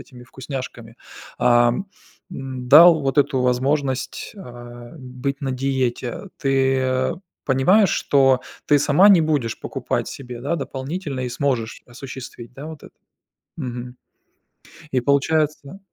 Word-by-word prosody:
этими 125 -1 -14
вкусняшками, 125 -3 -8 0.4
ам, 120 +7 +3 0.5
м, 130 -5 -6
дал 165 +3 +8
вот 135 +1 -1
эту 140 -2 +2
возможность, 130 +2 -1
а, 120 -6 -11
быть 130 +2 -5
на 135 -2 -2
диете. 130 +1 -2
Ты 130 -1 +1 0.3
понимаешь, 180 +9 +4
что 135 -2 +3 0.3
ты 145 - +5
сама 150 +7 +5
не 195 -4 +7
будешь 145 -8 -1
покупать - - -3
себе, 125 -3 -8
да, 145 +7 -1
дополнительно 140 +1 -5
и 125 - -2
сможешь 125 -3 -2
осуществить, 120 -1 -10
да, 140 +4 -9
вот 160 -2 -9
это? - - -15 0.6
Мгм. 125 -3 -6 1.0
И 130 - +1
получается 145 +4 0
130 Hz, 120 wpm, -21 LUFS, 125-145 Hz, 1.0 s, дал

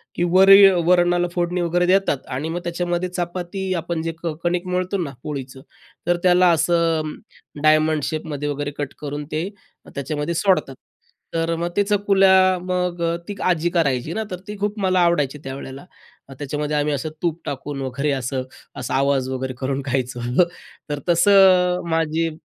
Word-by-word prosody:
की 175 - 0
वरी 195 +1 +9 0.2
वरणाला 175 0 +3
फोडणी 175 0 -1
वगैरे 175 +1 +1
देतात 185 -7 +1
आणि 155 +5 -3
मग 175 +2 -3
त्याच्यामध्ये 175 +1 -2
चपाती 180 +2 -3
आपण 170 -1 -3
जे 165 0 -2
क 165 -2 -1
कणिक 175 +1 -1
मळतो 180 +2 -1
ना 140 - -5
पोळीचं 135 -2 -6 0.5
तर 175 0 +3
त्याला 180 0 +5
असं 165 -1 +1 0.5
डायमंड 155 -1 +3
शेपमध्ये 150 -2 -3
वगैरे 145 0 -3
कट 145 -2 -4
करून 145 0 -5
ते 165 +5 -2 0.5
त्याच्यामध्ये 150 +4 -3
सोडतात. 180 -7 +1 0.6
तर 165 0 0
मग 170 +1 -2
ते 205 - +4
चकुल्या 195 -2 +4
मग 180 -1 -2
अ, 170 0 +1
ती 205 - -5
आज्जी 175 -1 +1
करायची 150 -4 0
ना 220 - -2
तर 180 - -5
ती 210 - -6
खूप 205 +1 -2
मला 185 -1 +2
आवडायची 150 -5 +2
त्यावेळेला. 135 +2 -8 0.5
त्याच्यामध्ये 150 +1 -3
आम्ही 150 0 0
असं 155 +3 -3
तूप 170 -1 -1
टाकून 140 0 -5
वगैरे 140 +3 -2
असं 130 0 -2 0.4
असा - - -4
आवाज 135 -1 +1
वगैरे 130 0 -3
करून 135 +1 -2
खायचं. 125 -2 -2 0.6
तर 145 -1 -2
तसं 185 0 +5
अ, - - -5
माझी 165 0 0
165 Hz, 160 wpm, -21 LUFS, 145-180 Hz, 0.6 s, वरी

